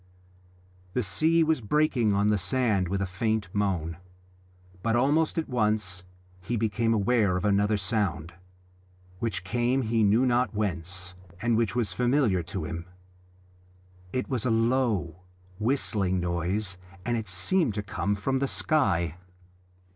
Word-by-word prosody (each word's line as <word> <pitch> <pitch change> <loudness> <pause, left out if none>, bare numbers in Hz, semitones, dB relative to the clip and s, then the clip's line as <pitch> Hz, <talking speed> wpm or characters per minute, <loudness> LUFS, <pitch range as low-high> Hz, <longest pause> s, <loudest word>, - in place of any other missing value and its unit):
The 125 - 0
sea 160 - +3
was 160 -4 +1
breaking 125 -2 +2
on 100 +1 +2
the 105 - +3
sand 105 -2 +1
with 100 +2 -1
a - - 0
faint 105 +2 -1
moan. 90 -6 -1 0.8
But 115 +2 +1
almost 145 +7 +2
at 165 - -1
once 105 -6 -1 0.4
he 120 +6 -2
became 115 +1 0
aware 105 -3 +2
of 90 - -3
another 105 +1 +2
sound, 95 -6 -1 0.9
which 100 -5 -2
came 120 +6 0
he 115 0 +1
knew 110 +5 +4
not 125 -2 +1
whence, 90 -2 -3 0.3
and 115 +1 +1
which 115 -1 +1
was 120 -4 0
familiar 125 -7 +2
to 80 - -5
him. 85 +1 -5 1.3
It 130 - -2
was 125 -5 -1
a 125 - +1
low 115 -7 +1 0.4
whistling 105 -6 +1
noise, 90 +2 -2 0.3
and 120 - 0
it 110 -2 -3
seemed 105 - +1
to 105 - -2
come 100 0 -1
from 130 +7 -1
the 140 - 0
sky. 85 - +1
105 Hz, 140 wpm, -27 LUFS, 95-120 Hz, 1.3 s, knew